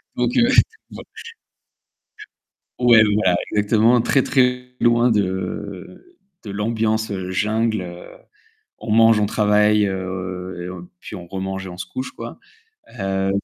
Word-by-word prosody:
Donc, 245 - -1
heu, 235 0 +5 0.4
bon - - -9 1.8
ouais 120 -3 +7
voilà 95 -4 +2 0.2
exactement, 110 +3 +3
très 135 +2 +2
très 125 -1 0
loin 120 +1 +3
de, 100 - -4 0.3
de 105 - -7
l'ambiance 110 +1 -1 0.2
jungle, 110 +2 0
heu, 85 -1 -8 0.7
on - - -7
mange, 115 0 +5
on 105 - +2
travaille, 105 0 +3
heu, 90 -1 -5
puis - - -9
on 90 -3 -8
remange 95 +1 -5
et - - -6
on 90 - -9
se 90 - -5
couche 130 0 -5
quoi. 115 0 -9 0.6
Heu 95 0 -1
105 Hz, 125 wpm, -21 LUFS, 95-115 Hz, 1.8 s, ouais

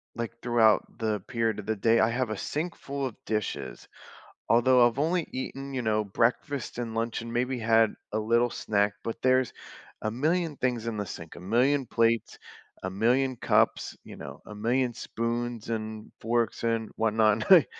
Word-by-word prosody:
like, 115 -1 -4
throughout 115 -3 +4
the 110 -2 -1
period 115 -2 0
of 105 - -7
the 110 - +1
day, 115 +3 +3
I 110 - +4
have 120 0 -1
a 110 - -3
sink 160 - -3
full 140 0 -4
of 125 - -4
dishes, 105 -2 -3 0.6
although 120 +1 +6
I've 120 +1 -4
only 165 +2 +1
eaten, 135 +1 -5
you 130 - 0
know, 110 -1 +1
breakfast 120 +7 -1
and 115 -2 -4
lunch 115 0 -1
and 115 - -7
maybe 125 +1 0
had 115 -1 +4 0.2
a - - +1
little 115 +3 +2
snack, 100 -2 0
but 115 - -5
there's 130 0 +3 0.5
a 110 - -1
million 155 +5 0
things 120 -3 -1
in 115 -2 -2
the 105 - -2
sink 80 -3 -8
a - - -9
million 125 +9 +2
plates, 115 -1 +1 0.5
a 95 - -1
million 125 +7 +2
cups, - - +1
you - - -10
know? - - -9
A 105 - -8
million 120 +4 +1
spoons, 120 0 -3
and 110 -1 -4
forks, 115 +1 0
and 115 -1 0
whatnot, 110 -1 +3
and 105 +1 -2
I 175 -6 +9
115 Hz, 180 wpm, -28 LUFS, 110-125 Hz, 0.6 s, I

